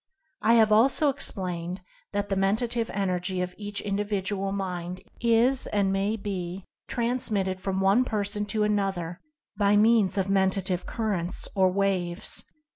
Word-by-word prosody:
I 230 +2 +4
have 220 -2 +5
also 265 +7 +4
explained 185 -9 -2 0.3
that 205 0 -2
the 195 - 0
Menta 195 +5 +2
tive 230 -1 -1
Energy 185 -1 -1
of 180 0 -2
each 205 0 -5
Individual 200 -1 -2
Mind 180 -2 -4 0.2
is, 235 +3 +2
and 200 -2 +1
may 200 +3 0
be, 190 -3 -5 0.2
transmitted 215 -6 0
from 190 0 -1
one 195 +6 +4
person 205 -3 -1
to 210 +1 0
another 195 -5 -1 0.4
by 205 0 +3
means 215 -2 +4
of 190 - +2
Mentative 190 -2 0
Currents, 200 -6 -2
or 190 -1 +4
Waves. 185 -2 0
195 Hz, 140 wpm, -27 LUFS, 185-215 Hz, 0.4 s, have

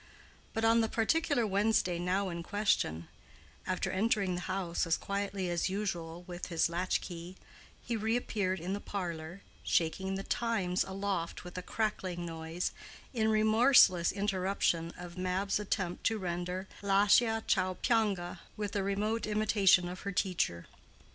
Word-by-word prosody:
But 225 0 +1
on 230 +1 +5
the 225 - 0
particular 260 +2 +1
Wednesday 200 -3 +2
now 185 +2 0
in 170 -1 -4
question, 170 - 0 0.6
after - - -1
entering 200 -1 +1
the 175 - -3
house 180 -2 -2
as 165 - +2
quietly 200 -1 -3
as 175 +1 0
usual 175 -4 -3
with 175 -1 -6
his 165 -1 +1
latch 180 +2 0
key, 175 +1 -8 0.5
he 225 -1 0
appeared 190 -6 -1
in 180 +4 -3
the 200 - -2
parlor, 175 -2 -5 0.2
shaking 190 +4 0
the 195 - -4
Times 205 -7 0
aloft 190 -3 -3
with 180 0 -10
a 180 - -3
crackling 185 -4 -2
noise, 165 +1 -3 0.4
in 220 -3 +1
remorseless 215 -4 +5
interruption 190 -4 0
of 175 0 -8
Mab's 185 +2 0
attempt 190 -3 -2
to 225 - +2
render 180 0 -3
Lascia 205 +3 +4
ch'io 185 -2 +1
pianga 205 -7 +1 0.2
with 210 -1 -3
a 200 - +1
remote 210 +4 -1
imitation 205 -4 +4
of 180 +2 -6
her 200 - -4
teacher. 180 - 0
190 Hz, 145 wpm, -32 LUFS, 175-210 Hz, 0.6 s, on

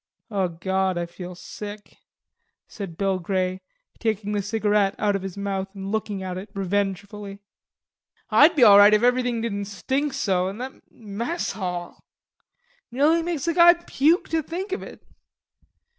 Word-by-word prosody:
"O 195 -3 +1
God, 190 +2 -1
I 175 - -1
feel 180 +1 -9
sick," 205 +3 -9 0.7
said 190 -6 -8
Bill 195 -2 0
Grey, 185 +1 -1 0.4
taking 215 -2 -1
the 205 -1 0
cigarette 210 -1 +1
out 205 -2 +1
of 195 - -2
his 195 0 -7
mouth 195 0 -3
and 195 0 -5
looking 210 -3 -2
at 185 -1 -4
it 200 +2 -10
revengefully. 200 +1 -3 0.9
"I'd 325 +4 +6
be 275 - +5
all 205 -3 +9
right 205 +1 +8
if 215 - +1
everything 245 -1 +2
didn't 205 -3 -3
stink 265 +8 -2
so. 190 -8 0
An' 195 - -7
that 255 +2 -9
mess 230 - -4
hall. 180 -3 -5 0.9
Nearly 295 +7 +3
makes 330 -3 -3
a 335 - +2
guy 345 +1 +7
puke 335 0 +1
to 325 0 +1
think 365 +6 -5
of 390 - -2
it." - - -11
205 Hz, 160 wpm, -24 LUFS, 190-245 Hz, 0.9 s, all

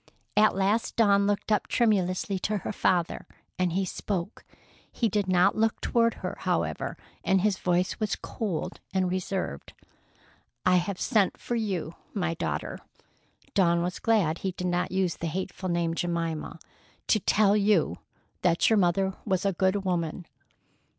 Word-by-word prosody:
At 215 -1 +5
last 200 +4 +1
Dawn 200 -3 +4
looked 205 +1 -1
up 210 - +2
tremulously 195 -4 +1
to 210 +3 -1
her - - -4
father, 180 -4 0 0.3
and 180 -2 +1
he 190 +1 +1
spoke. 190 +1 -4 0.5
He 235 - 0
did 205 -2 0
not 180 -1 +4
look 220 0 +1
toward 230 -1 +2
her, - - -4
however, - - -1 0.3
and 190 -1 +3
his 205 -1 +1
voice 180 +1 0
was 215 -2 0
cold 200 -8 -4 0.2
and 185 -1 +1
reserved. 185 - -3 0.9
"I 185 0 +5
have 180 +1 -2
sent 215 -7 +2
for 240 - -3
you, 190 -8 -2 0.2
my 175 -4 0
daughter—" 165 - -3 0.7
Dawn 170 -3 +3
was 180 0 -3
glad 190 -8 +2
he 190 -1 -2
did 180 - -5
not 175 0 0
use 185 -2 0
the 165 - -3
hateful 185 +2 -4
name 170 -1 0
"Jemima." 165 -2 -2 0.5
"—to 215 - +3
tell 205 +1 +3
you 200 - +2 0.4
that 175 +4 +3
your 220 - +5
mother 190 +1 +2
was 190 -3 0
a 195 - +2
good 190 +2 +1
woman." 175 -1 -1
190 Hz, 155 wpm, -27 LUFS, 175-205 Hz, 0.9 s, At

